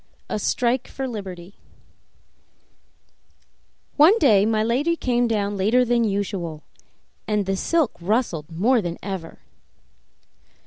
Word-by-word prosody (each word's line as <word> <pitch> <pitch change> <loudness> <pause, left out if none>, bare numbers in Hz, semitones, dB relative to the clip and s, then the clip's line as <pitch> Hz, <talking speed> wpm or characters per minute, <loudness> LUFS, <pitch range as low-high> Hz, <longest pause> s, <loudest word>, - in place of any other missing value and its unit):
23 - - -2
A - - -2
Strike 245 +4 0
for 270 -1 -5
Liberty 190 -5 -7 2.4
One 325 +9 +7
day 215 - +4
my 215 -1 +1
lady 270 +9 +1
came 245 -5 0
down 205 -2 -1
later 220 +6 +2
than 240 0 +2
usual, 195 -7 -3 0.6
and 210 -2 0
the 195 +1 -1
silk 315 - +1
rustled 175 - -1
more 225 +9 +2
than 175 -2 -4
ever. 190 -4 -6
215 Hz, 120 wpm, -23 LUFS, 190-245 Hz, 2.4 s, One